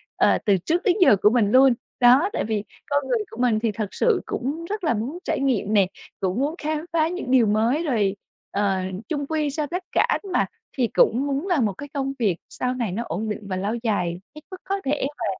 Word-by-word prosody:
ờ, - - +4
từ 200 -3 +4
trước 330 - -1
đến 375 -5 +3
giờ 325 - +7
của 210 - +6
mình 220 -3 +2
luôn. 260 +1 +6 0.3
Đó, 255 +9 +6
tại - - -1
vì 215 -2 -2 0.3
con 285 -1 0
người 480 - +1
của - - -10
mình 235 -4 +3
thì 225 0 0
thật 215 -1 -3
sự 450 -6 +2
cũng 290 +6 -3
rất 420 -1 -3
là 310 - +2
muốn 235 +9 -3
trải - - -1
nghiệm 240 -6 0
nè, 200 -3 +4 0.3
cũng 190 +3 -1
muốn 290 +4 0
khám 310 0 -3
phá 320 -1 +3
những 340 -7 -4
điều 255 -3 +5
mới. 225 +9 +2
Rồi, 215 - +1 0.4
ờ, 200 -1 +1 0.3
chung 290 -4 -2
quy 310 -1 0
sau 295 +1 -2
tất 360 +5 -4
cả - - +3 0.3
mà - - +3 0.3
thì 250 -3 +2
cũng 260 +5 +3
muốn 280 +6 -2
làm 325 - +2
một 205 - -1
cái 285 +9 -9
công 270 -2 -2
việc 200 -8 +1
sau 250 0 -2
này 235 -6 -2
nó 220 +6 -2
ổn 210 +7 -3
định 210 - -3
và 190 - -2
lâu 200 +4 -2
dài 180 -6 -1 0.2
hết 305 - -10
mức 370 - -8
có 395 0 -2
thể 285 0 0
và - - -2
255 Hz, 240 wpm, -23 LUFS, 210-305 Hz, 0.4 s, giờ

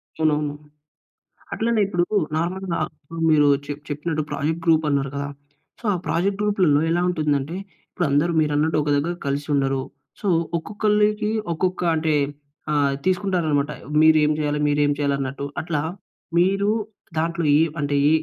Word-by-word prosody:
అవునవును. 150 -2 0 1.0
అట్లనే 230 -1 +1
ఇప్పుడూ 175 -2 +1 0.3
నార్మల్‌‌గా 180 +1 -2 0.5
మీరు 150 -2 +5 0.2
చె 145 - -5 0.2
చెప్పినట్టు 155 +1 -2
ప్రాజెక్ట్ 160 +3 -2
గ్రూప్ 160 -1 +4
అన్నారు 140 -1 0
కదా! 140 0 -3 0.5
సో, - - -22
ఆ - - 0
ప్రాజెక్ట్ 185 +6 0
గ్రూప్‌లలో 185 -8 +3
ఎలా 175 +1 +2
ఉంటుందంటే, 150 -2 -1 0.4
ఇప్పుడు 175 - -1
అందరూ 150 +5 +2
మీరు 150 -1 0
అన్నట్టు 155 +2 +1
ఒక 150 - -2
దగ్గర 160 +5 0
కలిసి 140 +1 -2
ఉండరు. 135 -1 +1 0.4
సో, 205 - -2 0.3
ఒక్కొక్కళ్ళకి 210 +2 +1 0.2
ఒక్కొక్క 185 +2 -1
అంటే 155 0 +1 0.6
ఆహ్, 140 -2 +2
తీసుకుంటారు 185 -2 +1
అనమాట. 145 0 +1 0.3
మీరు 160 0 +6
ఏం 150 - +3
జేయాలి? 150 -1 -1
మీరేం 145 0 +2
చేయాలి 140 -1 +1
అన్నట్టు? 140 +1 -3 0.2
అట్లా 155 -3 -2 0.6
మీరు 195 +3 +3 0.5
దాంట్లో 170 +1 0
ఇవ్ 160 0 +2
అంటే 145 -1 0
ఈ - - +5
155 Hz, 145 wpm, -23 LUFS, 145-180 Hz, 1.0 s, మీరు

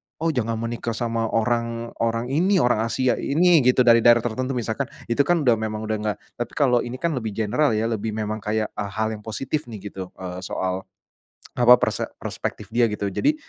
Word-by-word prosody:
oh 165 +1 0
jangan 115 -4 -1
menikah 115 0 -3
sama 115 0 -1
orang 115 +1 -1
orang 115 +2 -1
ini, 185 +7 +2
orang 120 -8 +2
Asia 125 +2 +1
ini 170 +3 +4
gitu 125 -1 +4
dari 115 -1 +6
daerah 120 0 +5
tertentu," 130 +3 -2
misalkan 120 +3 -2 0.2
itu 115 - -1
kan 170 -3 +2
udah 120 -4 +3
memang 110 0 -3
udah 110 0 -1
enggak, 105 -1 -2 0.2
tapi 120 - -3
kalau 125 -5 +3
ini 120 +1 -4
kan 165 +6 -1
lebih 110 -7 -3
general 115 +4 +1
ya 110 - 0
lebih 110 0 -2
memang 110 0 -3
kayak, 110 +1 -2
e - - -4
hal 110 +2 -2
yang 110 - -5
positif 125 +7 -4
nih 105 -3 -8
gitu, 95 -1 -6
eee, 90 -1 -6
soal 95 0 -3 0.7
apa 125 0 +8
perse - - 0 0.2
perspektif 105 -1 -5
dia 120 +1 +3
gitu, 105 -1 -2
jadi 295 - +2
115 Hz, 200 wpm, -23 LUFS, 110-125 Hz, 0.7 s, apa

